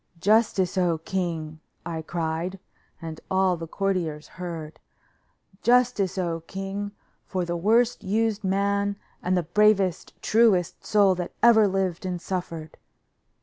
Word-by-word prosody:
"Justice, 200 -2 +2
O 175 -3 +2
king!" 160 -2 -3 0.3
I 165 -2 -3
cried, 165 +3 -3 0.4
and 160 -2 -7
all 190 -1 +2
the 165 -1 -7
courtiers 170 -5 -2
heard. 165 -4 -7 0.8
"Justice, 240 -6 +2
O 170 -3 -1
king! 195 +1 -4 0.4
for 185 -2 -2
the 175 0 -2
worst 225 +6 +2
used 215 +1 0
man 200 +1 +1 0.3
and 180 +1 +1
the 175 - +1
bravest, 195 0 +2
truest 205 -6 +3
soul 200 -3 +4
that 180 -1 -5
ever 220 -3 +7
lived 190 -3 -1
and 180 -1 -3
suffered." 170 -4 -5
185 Hz, 125 wpm, -25 LUFS, 170-200 Hz, 0.8 s, ever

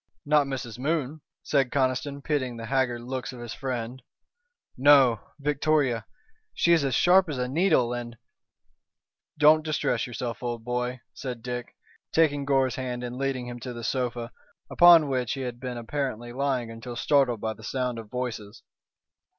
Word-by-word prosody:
"Not 145 -1 +3
Mrs. 125 -4 -5
Moon," 150 +1 -1 0.2
said 135 -3 +1
Conniston, 140 +2 -1
pitying 130 -5 -1
the 115 - -6
haggard 125 -1 0
looks 125 -3 -4
of 125 - -10
his 120 -1 -6
friend. 130 -2 -4 0.7
"No, 135 -4 +6 0.2
Victoria. 145 -5 +1 0.5
She 170 - +4
is 165 -4 +3
as 135 -2 0
sharp 185 0 +5
as 145 - -3
a 125 0 -1
needle 140 -5 +2
and 120 -1 -6 0.6
" - - -60
"Don't 155 +1 +6
distress 145 -7 -1
yourself, 120 0 -5
old 120 -2 -4
boy," 125 0 -2
said 125 -4 -6
Dick, 125 -1 -5 0.4
taking 145 -3 +2
Gore's 135 -2 +1
hand 125 -1 -4
and 125 0 -5
leading 135 -2 -1
him 120 0 -7
to 125 0 -6
the 120 0 -8
sofa 120 -1 -2 0.4
upon 170 -3 +7
which 130 -4 -1
he 135 - -5
had 125 -2 -5
been 125 -1 -5
apparently 120 -1 -4
lying 130 -3 -1
until 115 +2 -8
startled 130 -2 +2
by 110 +1 -2
the 110 - -16
sound 125 0 -2
of 110 -2 -10
voices. 115 -4 -5
125 Hz, 165 wpm, -26 LUFS, 120-140 Hz, 0.7 s, upon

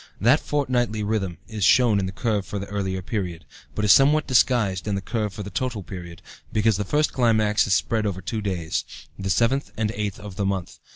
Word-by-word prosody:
The 120 +8 +5
fortnightly 125 -8 -1
rhythm 100 -5 -2
is 110 -3 -4
shown 115 0 +5
in 95 - -1
the - - -4
curve 105 +2 -1
for 105 - -6
the 100 - -4
earlier 95 -2 -3
period, 90 -7 -4 0.3
but 105 - 0
is 105 - +6
somewhat 150 +3 +5
disguised 115 -7 +2
in 105 - 0
the - - -1
curve 105 +1 -2
for 105 - -7
the 100 - -8
total 125 -2 -2
period, 85 -2 -9 0.3
because 110 -1 +2
the 105 - -1
first 150 +8 +1
climax 110 -5 +2
is 95 - +3
spread 110 +2 0
over 95 -2 -3
two 110 +4 -4
days, 90 -5 -2 0.4
the 95 0 -3
7th 120 +8 +1
and 110 -1 0
8th 105 -2 -3
of 105 -3 -9
the 100 - 0
month. 95 -3 -3
105 Hz, 215 wpm, -24 LUFS, 95-115 Hz, 0.4 s, is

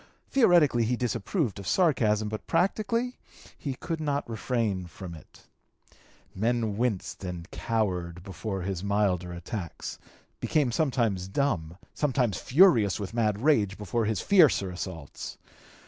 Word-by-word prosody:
Theoretically 170 - +5
he 125 +3 +1
disapproved 120 - -1
of 100 - -7
sarcasm, 110 - +2
but 110 0 -6
practically 215 +7 0 0.4
he 135 -3 -4
could 165 +4 -4
not 145 -1 -1
refrain 110 -5 -1
from 85 +1 -9
it. 80 - -15 0.9
Men 115 0 0
winced 105 -5 -2
and 90 -2 -5
cowered 90 -6 -2
before 95 0 -4
his 95 -1 -3
milder 100 -3 +1
attacks, 85 0 -6 0.4
became 145 -6 +1
sometimes 115 - 0
dumb, 95 - -1 0.2
sometimes 125 - +1
furious 125 - +4
with 100 +1 -5
mad 110 -2 0
rage 105 -10 +3
before 110 +2 -1
his 110 -2 0
fiercer 155 - +4
assaults. 90 -5 -7
110 Hz, 125 wpm, -28 LUFS, 95-135 Hz, 0.9 s, Theoretically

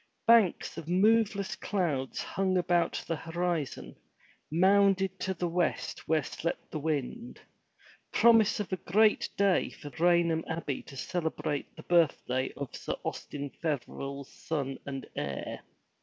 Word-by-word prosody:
Banks 225 -8 +4
of 160 - -9
moveless 200 +2 +3
clouds 155 -10 -1
hung 190 -1 0
about 175 -1 +1
the 165 - 0
horizon, 165 -3 -3 0.5
mounded 190 +2 +3
to 190 0 -2
the 175 +1 -1
west 175 +1 -1
where 160 -2 +2
slept 170 +5 -4
the 155 - -3
wind, 155 - -3 0.4
— - - -36 0.3
promise 225 -3 +5
of 205 -2 -3
a - - 0
great 210 +5 +3
day 200 -2 +3
for 145 - -10
Raynham 170 -2 +3
Abbey 160 -4 -3
to 135 - -10
celebrate 155 -2 -3
the - - -11
birthday 145 -6 +2
of 140 -3 -5
Sir - - -3
Austin 145 -1 -5
Feverers 140 -2 -3
son 140 -4 -3
and 135 -1 -5
heir. 70 -2 -4
170 Hz, 135 wpm, -30 LUFS, 145-190 Hz, 0.5 s, promise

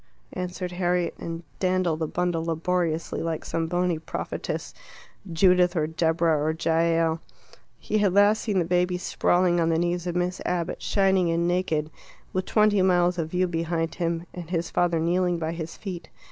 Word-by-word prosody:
answered 180 0 -4
Harriet, 175 -1 0
and 165 0 -5 0.2
dandled 185 -4 +1
the 160 - -1
bundle 175 0 -1
laboriously, 165 0 -1
like 165 -1 -3
some 165 0 -2
bony 175 -1 0
prophetess 160 - -5 0.6
Judith, 180 +1 +4
or 155 -3 +1
Deborah, 160 0 +1
or 160 +1 -1
Jael. 165 0 +2 0.6
He 215 - -1
had 205 -2 +3
last 205 +3 +4
seen 210 -4 -1
the 175 - +2
baby 180 +1 +1
sprawling 175 0 +2
on 165 -1 +2
the 165 - +2
knees 175 +1 -1
of 175 - -2
Miss 180 +1 -1
Abbott, 175 -2 -2
shining 190 -3 +2
and 170 +1 +1
naked, 165 -4 0 0.4
with 185 0 -1
twenty 210 -1 +3
miles 180 -1 +3
of 160 -1 -2
view 180 +2 +1
behind 165 -1 -2
him, 170 0 -1
and 175 -2 -8
his 170 -1 -2
father 175 -2 +1
kneeling 175 +1 +1
by 160 -1 -2
his 165 -1 -6
feet. 180 -5 -7
175 Hz, 170 wpm, -25 LUFS, 165-180 Hz, 0.6 s, Judith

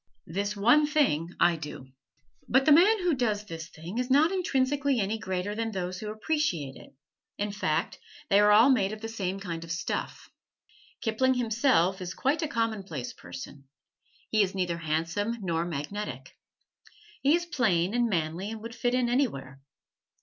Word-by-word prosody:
This 200 +5 -3
one 245 +9 +5
thing 185 - +1
I 175 -1 +4
do. 150 -4 -8 0.6
But 265 +2 +4
the 305 - +5
man 375 +6 +6
who 355 -2 +2
does 215 -6 0
this 165 -4 -7
thing 175 +9 -6
is 250 +1 -2
not 295 +6 +5
intrinsically 280 -6 +1
any 210 +2 -1
greater 190 0 -3
than 225 +1 -2
those 185 -3 -4
who 215 - -5
appreciate 215 - -1
it - - -15 0.4
in 205 0 -2
fact, 190 -1 -1 0.3
they 200 - +4
are 210 0 +5
all 220 +6 +7
made 210 -6 +2
of 215 - -8
the 225 - -4
same 195 -4 -3
kind 170 -4 -5
of 165 - -8
stuff. 170 - -4 0.7
Kipling 260 +3 +1
himself 220 -6 +2
is 180 -1 -5
quite 290 +5 0
a 315 - 0
commonplace 200 - -3
person. 135 +1 -10 0.7
He 220 - +4
is 195 -1 0
neither 180 -3 -1
handsome 165 +8 -1
nor 170 -4 -1
magnetic. 150 -4 -5 0.9
He 285 +4 +4
is 345 0 -1
plain 205 - +1
and 240 -1 +2
manly 170 +1 -2
and 225 0 -6
would 230 +2 -8
fit 245 +1 0
in 250 -1 +2
anywhere. 140 - -1
210 Hz, 170 wpm, -28 LUFS, 170-250 Hz, 0.9 s, all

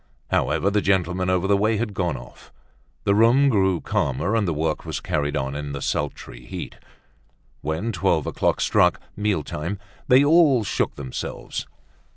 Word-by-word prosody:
However, 80 +9 +1
the 105 0 +2
gentleman 90 -1 +1
over 95 0 +1
the 100 +1 +3
way 105 +2 +2
had 110 -1 -2
gone 90 -4 -1
off. - - -14 0.5
The 100 - +3
room 120 +7 +5
grew 95 -6 +2
calmer 80 - -1
and 110 -4 +1
the - - +1
work 80 0 -1
was - - -4
carried 75 0 -1
on 65 -1 -2
in 75 -1 -5
the 70 - -4
sultry 60 -4 -3
heat. - - -7 0.8
When 80 +10 -2
twelve 85 -5 +1
o'clock - - 0
struck—meal 105 -6 +1
time—they 100 - 0
all 150 -6 +5
shook 100 - -1
themselves. 65 -2 -5
95 Hz, 155 wpm, -23 LUFS, 75-105 Hz, 0.8 s, room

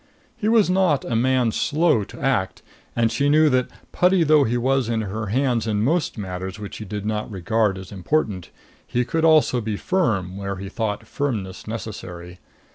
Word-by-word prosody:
He 210 - -3
was 220 -2 +4
not 180 -6 +2
a 115 - -2
man 125 0 +2
slow 155 -3 +2
to - - -12
act. 110 -8 -1 0.3
And 115 -1 +2
she 140 +5 +1
knew 155 +1 +5
that, 130 -2 +2 0.2
putty 180 -1 +3
though 150 -2 +5
he 120 +2 0
was 130 0 +1
in 115 -1 0
her 110 +1 -4
hands 120 0 0
in 105 -1 0 0.3
matters 95 -1 -5
which 105 -1 -7
he 110 - -7
did 105 +1 -5
not 105 0 -2
regard 105 +1 0
as 95 -1 -9
important, 100 - -1 0.4
he 125 0 0
could 160 +5 -1
also 155 -7 +4
be 105 -2 -3
firm 100 - 0
where 100 0 -4
he 95 +1 -7
thought 105 -2 -3
firmness 110 -11 -3
necessary. 90 -5 -7
115 Hz, 180 wpm, -22 LUFS, 100-140 Hz, 0.4 s, knew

